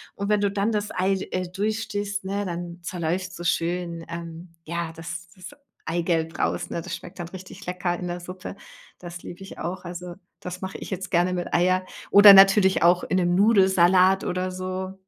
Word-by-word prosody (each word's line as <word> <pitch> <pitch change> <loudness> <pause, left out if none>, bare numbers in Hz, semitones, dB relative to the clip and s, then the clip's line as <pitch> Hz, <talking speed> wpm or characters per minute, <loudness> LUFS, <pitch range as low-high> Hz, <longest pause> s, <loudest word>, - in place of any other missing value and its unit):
Und 200 0 -3
wenn 210 -1 +3
du 205 - +1
dann 200 +3 0
das 210 -1 -2
Ei, 190 +2 +1 0.2
äh, 185 0 -2
durchstichst, 205 0 -3
ne, 200 +1 -2
dann 175 -1 -5
zerläuft's 180 0 -3
so 175 - -8
schön, 170 0 -1
ähm, 170 0 -8
ja, 170 0 -4
das 165 +1 -7
das 185 +1 -10 0.4
Eigelb 165 -1 -1
raus, - - -1
ne, 170 - -3
das - - -5
schmeckt 180 +2 -12
dann 175 - -4
richtig 185 +2 -11
lecker 180 -1 -2
in 180 - -4
der 175 0 -4
Suppe. 185 +2 -8 0.4
Das 175 -1 -9
liebe 175 - -10
ich 195 - -11
auch. 180 +2 -4
Also, 175 0 -7 0.2
das 180 0 -7
mache 190 0 -5
ich - - -8
jetzt 190 -1 -5
gerne 180 0 +2
mit 175 -1 -4
Eier 185 +1 +2 0.3
oder 205 0 +10
natürlich 195 0 +6
auch 175 +1 +4
in 185 - 0
'nem 175 -1 +2
Nudelsalat 190 -2 +4
oder 185 +1 -2
so, 185 +1 -4
180 Hz, 190 wpm, -24 LUFS, 175-190 Hz, 0.4 s, oder